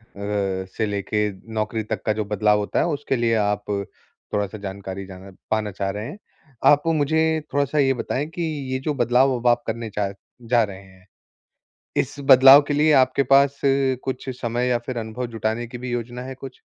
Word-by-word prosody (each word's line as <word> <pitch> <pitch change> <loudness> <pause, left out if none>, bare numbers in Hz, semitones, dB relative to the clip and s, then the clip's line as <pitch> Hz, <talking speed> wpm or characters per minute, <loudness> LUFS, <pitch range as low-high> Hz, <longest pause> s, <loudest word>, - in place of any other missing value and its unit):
से 100 0 -2
लेके 105 +1 -1 0.2
नौकरी 110 0 -2
तक 105 - -4
का 110 - +2
जो 105 0 -3
बदलाव 105 +1 +2
होता 105 - -1
है, - - +2
उसके 145 -4 -1
लिए 115 -2 +1
आप 105 0 0 0.7
थोड़ा-सा 105 +1 -2
जानकारी 95 -1 -6
जाना 95 +1 -11 0.2
पाना 110 -1 0
चाह 95 +1 -3
रहे 105 +3 -4
हैं। 200 - -8 0.5
आपको 145 +3 +3
मुझे 160 +1 +1
थोड़ा-सा 145 +1 0
ये 135 -1 +4
बताएँ 130 +3 -3
कि 175 - -3 0.3
ये 130 - -1
जो 150 - 0
बदलाव 125 +1 +3
अब 120 - -2
आप 120 0 +3
करने 115 0 -3
चा 100 -1 -2 0.3
जा 120 0 +2
रहे 100 -2 -6
हैं, 95 -1 -20 0.9
इस - - 0
बदलाव 135 +1 +8
के 145 - 0
लिए 150 +1 +4
आपके 130 +2 +1
पास 140 0 +4
कुछ 135 -1 0
समय 120 +1 -1
या 120 - +2
फिर 125 -2 -3
अनुभव 110 +3 -4
जुटाने 110 +2 -2
की 125 +1 -9
भी 125 +1 -6
योजना 120 +1 -4
है 130 +1 -7
कुछ? 130 0 -11
120 Hz, 185 wpm, -23 LUFS, 105-135 Hz, 0.9 s, बदलाव